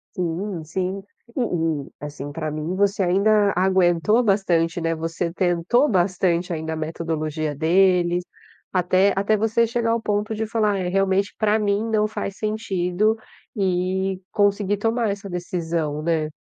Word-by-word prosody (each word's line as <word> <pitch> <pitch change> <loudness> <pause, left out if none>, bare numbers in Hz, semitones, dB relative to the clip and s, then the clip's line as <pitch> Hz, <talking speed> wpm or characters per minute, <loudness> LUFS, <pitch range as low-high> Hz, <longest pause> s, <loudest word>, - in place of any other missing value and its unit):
Sim, 180 0 -3
sim, 185 +4 -3 0.3
e 265 - 0 0.4
e - - -16
assim 145 -1 -7
para 155 +1 -4
mim 155 +4 -3
você 200 +1 +1
ainda 200 +3 +3
aguentou 185 +4 +3
bastante, 175 -5 +1
né, 165 0 0
você 165 +1 -3
tentou 185 - +2
bastante 180 -2 +1
ainda 160 0 -3
a - - -3
metodologia 155 -1 -3
deles, 175 +2 +3 0.5
até 185 +2 +3
até 200 +2 +2
você 225 +2 +2
chegar 230 0 0
ao 230 0 0
ponto 210 0 -1
de 220 +1 -2
falar: 215 -2 +1
"É 180 -1 -2
realmente 195 +1 +1
para 215 0 +3
mim 210 +1 0
não 215 -1 +2
faz 200 -2 -5
sentido" 215 -1 0 0.4
e 190 0 0
conseguir 205 -1 +1
tomar 225 +1 0
essa 200 0 -4
decisão, 165 -4 -3
né. 160 -2 0
190 Hz, 145 wpm, -23 LUFS, 170-205 Hz, 0.5 s, ainda